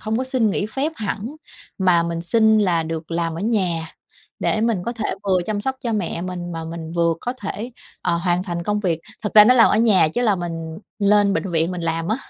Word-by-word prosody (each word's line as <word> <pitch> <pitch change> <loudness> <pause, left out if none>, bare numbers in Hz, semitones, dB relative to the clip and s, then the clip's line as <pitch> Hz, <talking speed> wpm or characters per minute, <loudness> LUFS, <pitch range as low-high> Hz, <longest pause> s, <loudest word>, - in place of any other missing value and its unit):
hông 220 +1 -2
có 260 - -1
xin 255 -4 +1
nghỉ 200 - -1
phép 275 +8 -2
hẳn, 220 +6 -4 0.4
mà 180 -3 +4
mình 170 0 -3
xin 220 +5 +3
là 175 -5 +2
được 160 0 -5
làm 165 -1 -1
ở 165 - -5
nhà 185 -7 0 0.5
để 215 - 0
mình 225 -5 +1
có 235 - -1
thể 225 -2 -5 0.2
vừa 190 -2 +2
chăm 210 -1 -2
sóc 265 +4 -2
cho 235 -2 -2
mẹ 175 -4 -2
mình, 175 -1 -5
mà 165 0 -5
mình 165 0 -7
vừa 170 -1 +2
có 245 - -3
thể, 215 +4 -4 0.3
ờ, 170 -1 +1
hoàn 175 +1 0
thành 170 -2 -4
công 210 +3 -1
việc. 170 -5 -1 0.2
Thật 210 - -4
ra 210 - +10
nói 250 +3 +5
làm 230 - +6
ở - - +3
nhà 205 -8 +4
chứ 245 +10 -2
là 210 -5 +3
mình 165 -1 -5 0.2
lên 205 0 +4
bệnh 195 - -2
viện 165 0 +1
mình 180 -1 -4
làm 165 +1 -2
á 220 - +1
185 Hz, 240 wpm, -21 LUFS, 170-220 Hz, 0.5 s, ra